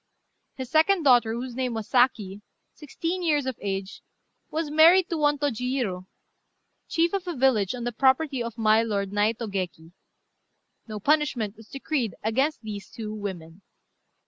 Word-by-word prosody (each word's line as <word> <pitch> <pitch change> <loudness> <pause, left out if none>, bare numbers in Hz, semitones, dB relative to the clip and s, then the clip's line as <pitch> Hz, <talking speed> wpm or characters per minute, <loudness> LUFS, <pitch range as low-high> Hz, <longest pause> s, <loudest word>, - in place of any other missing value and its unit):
His 260 -1 -7
second 330 +3 +3
daughter, 245 -5 +4
whose 245 +1 -5
name 250 -1 -2
was 220 -2 -5
Saki, 220 -6 +1 0.3
sixteen 335 +4 -4
years 300 -5 +1
of 260 -2 -3
age, 195 -1 -4 0.5
was 315 -1 -3
married 335 +4 +6
to 335 - 0
one 295 -1 +2
Tôjiurô, 250 -8 -2 0.8
chief 335 +2 +1
of 385 -2 -2
a 350 - -3
village 250 -5 +2
on 240 - -6
the 240 - -2
property 265 +3 +2
of 235 -1 -5
my 220 0 +4
lord 200 -3 -2
Naitô 215 +3 0
Geki. 180 -5 -5 1.0
No 215 -1 -6
punishment 265 -5 +1
was 220 0 -16
decreed 270 - -2
against 265 +7 0
these 205 -2 -7
two 215 -2 -7
women. 190 -4 -7
240 Hz, 150 wpm, -25 LUFS, 210-290 Hz, 1.0 s, married